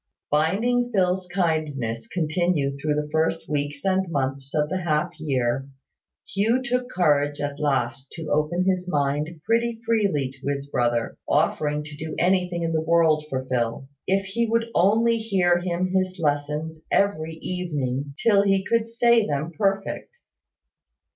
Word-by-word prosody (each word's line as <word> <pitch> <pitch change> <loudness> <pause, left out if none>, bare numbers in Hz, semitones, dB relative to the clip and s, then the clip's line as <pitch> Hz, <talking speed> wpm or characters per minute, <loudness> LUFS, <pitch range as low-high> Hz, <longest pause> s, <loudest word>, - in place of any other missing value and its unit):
Finding 225 +11 +2
Phil's 185 -3 +1
kindness 155 -10 -1
continue 160 -4 0
through 150 +2 -1
the 150 0 -1
first 160 +1 0
weeks 145 0 -3
and 190 -1 +1
months 135 -1 -2
of 150 -1 +2
the 185 +4 -2
half 170 +1 0
year, 135 -3 -1 0.6
Hugh 225 +6 +2
took 250 0 -1
courage 145 - +2
at 145 0 -3
last 135 -3 -1
to 165 -2 -6
open 155 +5 +1
his 185 -1 0
mind 150 +2 -1
pretty 230 0 +1
freely 200 - +1
to 135 +1 -10
his 140 0 -2
brother, 120 -1 0
offering 150 0 +1
to 150 0 -9
do 155 +1 -6
anything 180 -1 +1
in 165 - 0
the 160 - +1
world 160 -2 +3
for 130 -2 -3
Phil, 125 +1 -2 0.2
if 195 +1 +1
he 230 +5 -1
would 230 0 0
only 225 +5 +3
hear 185 -5 +2
him 180 +1 -1
his 185 0 0
lessons 150 0 -1
every 165 -5 +1
evening 145 -6 -3
till 205 -3 +4
he 195 -1 +2
could 230 -1 +1
say 235 0 +4
them 150 +3 -2
perfect. 195 - -2
160 Hz, 150 wpm, -24 LUFS, 145-190 Hz, 0.6 s, till